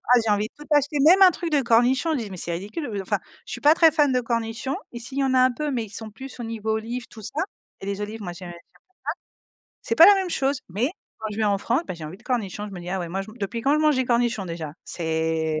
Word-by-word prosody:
Ah, - - +6
j'ai 215 - +2
envie 210 +1 +1
de - - -31
tout 295 - -10
acheter 290 +1 +3
même 370 +5 +7
un 370 -1 +9
truc 335 0 -4
de 290 -2 +3
cornichons, 250 +6 +3
je - - 0
dis: 225 -4 -4
«Mais 185 - -7
c'est 170 - -3
ridicule», 210 - -5
heu, 205 -4 -3
enfin - - 0 0.3
je - - -10
suis - - -5
pas 300 +2 +6
très 330 -1 +6
fan 295 -3 +3
de 255 - +2
cornichons. 230 +2 -2 0.2
Ici, 240 +2 -7
il - - +1
y - - +3
en 265 -1 +1
a - - +5
un 255 0 +5
peu, 300 +5 -3
mais 250 -5 -1
ils - - -14
sont 220 +2 -7
plus 265 +5 -10
au - - -4
niveau 220 -1 -3
olive, 235 +3 -3
tout 220 - -12
ça 290 +9 -3 0.4
et - - -8
les 200 0 -3
olives, 215 +2 -5
moi, 175 - -4
j'ai 180 +1 -10
j'aime 175 - -7
pas - - -11
ça. - - -16 1.2
C'est - - -1
pas 330 - +10
la 410 - +9
même 380 -2 -1
chose, 275 -3 0
mais 215 - 0 0.3
quand 220 - -3
je - - -7
vais 220 - +2
en 200 -1 +2
France, 235 +7 +1
bah - - -4
j'ai 165 -2 -8
envie 155 +4 -7
de - - -22
cornichons. 210 -5 -2
Je - - -11
me 180 - -7
dis: 175 - -8
«Ah 190 - -1
ouais, 175 - -4
moi, 190 +3 -2
je 195 - -12
man 220 - -15
depuis 220 +4 -3
quand 280 +4 +3
je - - +2
mange 305 -2 +4
des 260 - +2
cornichons 235 -3 +1
déjà?». 165 -3 -5
C'est 160 -1 -1
230 Hz, 310 wpm, -24 LUFS, 195-270 Hz, 1.2 s, pas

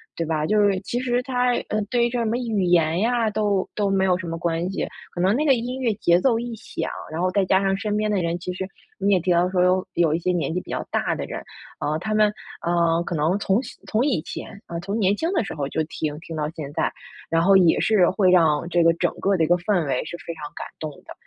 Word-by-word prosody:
对 165 - -2
吧。 155 -1 -1
就 210 +4 +3
是 200 -2 +3
其 240 +5 -3
实 245 -1 0
它， 250 -1 +1 0.2
嗯， 215 0 0
对 240 -1 +2
于 - - +1
这 245 - -2
什 230 - 0
么 225 +2 0
语 225 -6 -1
言 170 -1 +3
呀， 230 0 +2
都 205 -2 0
都 205 -2 +1
没 190 -1 +2
有 180 -1 +3
什 185 -2 -6
么 165 0 -3
关 170 +1 -1
系。 - - -2 0.3
可 - - -6
能 190 +4 +3
那 300 +4 +1
个 275 - +6
音 250 +2 -3
乐 235 -4 +1
节 175 -4 +3
奏 230 -4 +3
一 240 -1 -5
响， 220 - -5 0.2
然 165 +2 -3
后 185 0 +1
再 200 0 +2
加 190 +1 +3
上 195 0 +2
身 210 0 -2
边 215 0 0
的 195 -3 +1
人， 170 +1 -1
其 180 - -4
实 185 +1 -4 0.3
你 200 +1 +2
也 185 - +4
提 180 +1 0
到 175 +1 +3
说 185 -1 +1
有 185 +1 +2
有 165 -3 +2
一 165 - 0
些 180 +2 0
年 170 -2 -1
纪 180 - 0
比 - - -16
较 - - -3
大 - - 0
的 - - -4
人， - - -6 0.4
嗯， 150 +1 0
他 215 +3 -3
们， 215 -1 +4 0.4
嗯， 170 -1 +2
可 175 - -3
能 160 +6 +1
从 200 +4 +2
小 - - -10
从 225 +5 +1
以 245 - +1
前， 200 +4 -8
嗯， 170 - -4
从 200 +4 -3
年 200 0 +3
轻 330 - -1
的 285 - +2
时 - - -5
候 140 -2 -2
就 160 - -1
听 150 -1 -4
听 165 - -8
到 150 -1 -2
现 145 -3 -6
在， - - 0 0.4
然 165 0 +2
后 195 +3 +5
也 175 -3 +4
是 200 -6 +4
会 190 -1 +3
让 165 -3 +3
这 175 -1 +3
个 165 0 +5
整 175 0 0
个 195 -1 +2
的 165 - +2
一 - - +2
个 175 - +5
氛 180 -1 0
围 130 -2 0
是 175 - -6
非 170 - -4
常 155 -2 -11
感 - - -6
动 155 -1 -4
的。 - - -9
185 Hz, 300 characters per minute, -23 LUFS, 170-215 Hz, 0.4 s, 个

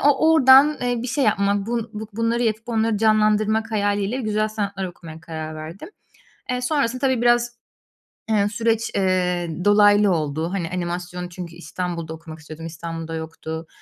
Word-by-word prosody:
o 290 +2 +4
oradan, 280 0 +7
eee, 245 -1 0
bir 250 - -4
şey 275 +3 +1
yapma, 200 -2 +1
bu 230 -1 -2
bu 215 0 -6
bunları 230 +2 0
yapıp 220 +1 -1
onları 225 -1 +1
canlandırmak 215 0 +2
hayaliyle 205 +3 0
güzel 215 -1 0
sanatlar 200 -3 -3
okumaya 165 -3 -10
karar 160 -1 -6
verdim. 165 - -8 0.6
Eee, 250 0 -1
sonrasında 255 -2 0
tabii, 260 -3 +1
biraz, 240 0 +2 0.7
eee, 205 -2 +3
süreç, 225 +1 0
eee, 180 -2 +1 0.2
dolaylı 205 0 +5
oldu. 160 +1 -1
Hani, 175 -4 -2
animasyon 180 0 -4
çünkü 175 -1 -8
İstanbul'da 170 -2 -5
okumak 160 0 -10
istiyordum, 160 +1 -10
İstanbul'da 165 0 -6
yoktu. 160 0 -6
205 Hz, 150 wpm, -22 LUFS, 170-230 Hz, 0.7 s, oradan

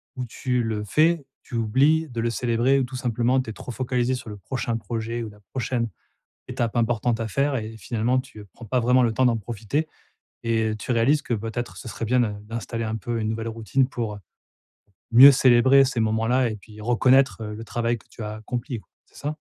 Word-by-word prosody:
où 125 -1 -4
tu 125 +1 -1
le 110 -2 -2
fais, 155 - +2 0.2
tu 120 - -8
oublies 140 +8 +3
de 115 -2 -3
le 115 - 0
célébrer. 120 +3 +2
Ou - - +1
tout 130 +1 -6
simplement 125 +1 +1
tu 115 - -8
es - - -4
trop 125 - -8
focalisée 125 0 0
sur 120 -3 -8
le 105 - -7
prochain 120 +1 -3
projet 115 +2 -4
ou 110 - -6
la 105 0 -16
prochaine 120 -2 -1 0.6
étape 115 0 -2
importante 115 0 +1
à 115 - -2
faire. 140 +5 0
Et 110 -1 -4
finalement 115 +5 0
tu, 110 - -10
heu, 105 - -11
prends 115 - -11
pas 125 +4 +1
vraiment 125 +2 +4
le 115 -2 +1
temps 130 +3 +2
d'en 115 -2 +3
profiter 115 +8 -3 0.6
et 110 -1 +1
heu, 110 - -3
tu 120 - -3
réalises 135 +6 +3
que 120 - -2
peut-être 115 +3 -4
ce 120 - -8
serait 115 - -5
bien 125 +3 +2
d'in 105 -3 -1
d'installer 115 +1 -4
un 110 0 -2
peu 115 +2 -3
une 110 - -1
nouvelle 115 +1 -3
routine. 115 +4 0
Pour, 115 -5 -3
heu, 105 - -9 0.9
mieux 135 +4 +10
célébrer 130 +2 +5
ces 130 -3 -2
moments-là 115 +3 +2
et 110 - -4
puis 105 +1 -13
reconnaître, 125 +2 +3
heu, 105 -1 -5
le 115 - -7
travail 120 +1 -1
que - - -24
tu - - -11
as 105 0 -5
accompli, 120 +1 -5 0.2
c'est - - -28
ça? 150 +1 -4
120 Hz, 220 wpm, -24 LUFS, 110-130 Hz, 0.9 s, mieux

